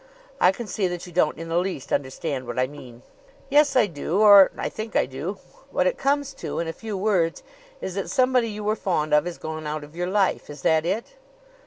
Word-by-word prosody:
I -, -, +6 dB
can 235 Hz, +5 st, -7 dB
see 200 Hz, -1 st, -1 dB
that 175 Hz, -1 st, -5 dB
you 175 Hz, -, -12 dB
don't 160 Hz, -3 st, +2 dB
in 165 Hz, +1 st, -7 dB
the 165 Hz, +1 st, +1 dB
least 180 Hz, -7 st, -4 dB
understand 135 Hz, -1 st, -2 dB
what 120 Hz, -, -5 dB
I 130 Hz, -, +3 dB
mean." 130 Hz, -3 st, -12 dB, 0.5 s
"Yes; 290 Hz, 0 st, +4 dB
I 250 Hz, -4 st, +5 dB
do 170 Hz, +1 st, -2 dB
or 205 Hz, -2 st, +9 dB
I -, -, -2 dB
think 220 Hz, +1 st, -7 dB
I -, -, +4 dB
do. 140 Hz, +10 st, -5 dB, 0.3 s
What -, -, 0 dB
it -, -, 0 dB
comes 280 Hz, 0 st, 0 dB
to, -, -, -4 dB
in 170 Hz, -, -1 dB
a 165 Hz, -, -3 dB
few 215 Hz, 0 st, -6 dB
words, 185 Hz, -5 st, +1 dB, 0.4 s
is 190 Hz, -, -4 dB
that 195 Hz, 0 st, -3 dB
somebody 255 Hz, -3 st, +2 dB
you 210 Hz, 0 st, -6 dB
were 215 Hz, +1 st, +1 dB
fond 155 Hz, -7 st, -1 dB
of 150 Hz, +1 st, +4 dB
has 175 Hz, -, -5 dB
gone 155 Hz, -1 st, -6 dB
out 150 Hz, 0 st, -3 dB
of 150 Hz, +2 st, -13 dB
your 175 Hz, +1 st, -2 dB
life. 195 Hz, -3 st, 0 dB
Is 145 Hz, -2 st, -10 dB
that 160 Hz, +1 st, +3 dB
it?" 225 Hz, -, -3 dB
180 Hz, 230 wpm, -24 LUFS, 155-215 Hz, 0.5 s, or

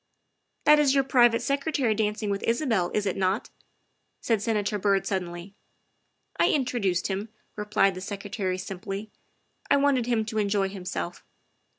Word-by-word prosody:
" -, -, -48 dB
That 300 Hz, 0 st, +7 dB
is 280 Hz, -2 st, +3 dB
your 275 Hz, -, +4 dB
private 240 Hz, -3 st, +4 dB
secretary 275 Hz, -4 st, 0 dB
dancing 210 Hz, -1 st, -1 dB
with 200 Hz, -, -2 dB
Isabel, 230 Hz, -, +1 dB
is 210 Hz, -, +1 dB
it 190 Hz, -, 0 dB
not? 190 Hz, +3 st, -1 dB, 0.3 s
' -, -, -46 dB
' -, -, -48 dB
said 225 Hz, -4 st, +1 dB
Senator 210 Hz, -1 st, 0 dB
Byrd 195 Hz, 0 st, +2 dB
suddenly. 180 Hz, 0 st, -4 dB, 0.4 s
" -, -, -34 dB
I -, -, +4 dB
introduced 235 Hz, -, 0 dB
him," 200 Hz, +3 st, -3 dB, 0.3 s
replied 210 Hz, -2 st, +2 dB
the 185 Hz, -, -7 dB
Secretary 195 Hz, -1 st, -3 dB
simply. 195 Hz, +3 st, -6 dB, 0.3 s
" -, -, -30 dB
I 285 Hz, -, +5 dB
wanted 275 Hz, -4 st, +2 dB
him 230 Hz, -3 st, +1 dB
to 220 Hz, 0 st, -2 dB
enjoy 200 Hz, -1 st, +1 dB
himself." 180 Hz, -2 st, -5 dB
210 Hz, 170 wpm, -26 LUFS, 195-240 Hz, 0.4 s, That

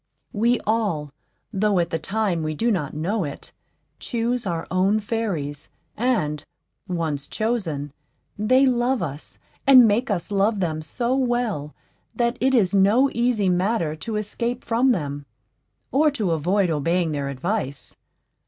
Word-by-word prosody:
We 235 Hz, +3 st, +2 dB
all, 200 Hz, -10 st, -1 dB, 0.4 s
though 200 Hz, 0 st, +2 dB
at 170 Hz, -1 st, 0 dB
the 165 Hz, -, -1 dB
time 195 Hz, 0 st, -1 dB
we 155 Hz, 0 st, -2 dB
do 230 Hz, +8 st, +1 dB
not 155 Hz, -8 st, -2 dB
know 190 Hz, +7 st, -1 dB
it, 145 Hz, -3 st, -7 dB, 0.5 s
choose 240 Hz, -1 st, -2 dB
our 170 Hz, -2 st, -2 dB
own 190 Hz, +4 st, +2 dB
fairies, 190 Hz, -10 st, -3 dB, 0.3 s
and, 155 Hz, -12 st, 0 dB, 0.4 s
once 160 Hz, -6 st, -2 dB
chosen, 170 Hz, -, -2 dB, 0.4 s
they 255 Hz, +6 st, +3 dB
love 245 Hz, -2 st, +1 dB
us 145 Hz, -2 st, -6 dB, 0.3 s
and 255 Hz, -4 st, +9 dB
make 230 Hz, +5 st, +1 dB
us 200 Hz, -1 st, -2 dB
love 200 Hz, +1 st, +2 dB
them 160 Hz, -4 st, -1 dB
so 240 Hz, +10 st, -1 dB
well 240 Hz, -, -1 dB, 0.4 s
that 235 Hz, 0 st, +1 dB
it 265 Hz, +1 st, +3 dB
is 200 Hz, -6 st, +3 dB
no 210 Hz, +8 st, +4 dB
easy 235 Hz, -4 st, +1 dB
matter 180 Hz, -3 st, +1 dB
to 220 Hz, +6 st, -5 dB
escape 235 Hz, +4 st, -2 dB
from 240 Hz, +3 st, +2 dB
them, 145 Hz, -, -3 dB, 0.6 s
or 305 Hz, +3 st, +4 dB
to 215 Hz, -, -1 dB
avoid 175 Hz, +4 st, +1 dB
obeying 165 Hz, +3 st, 0 dB
their 140 Hz, -2 st, -2 dB
advice. 140 Hz, 0 st, -3 dB
200 Hz, 145 wpm, -23 LUFS, 160-235 Hz, 0.6 s, and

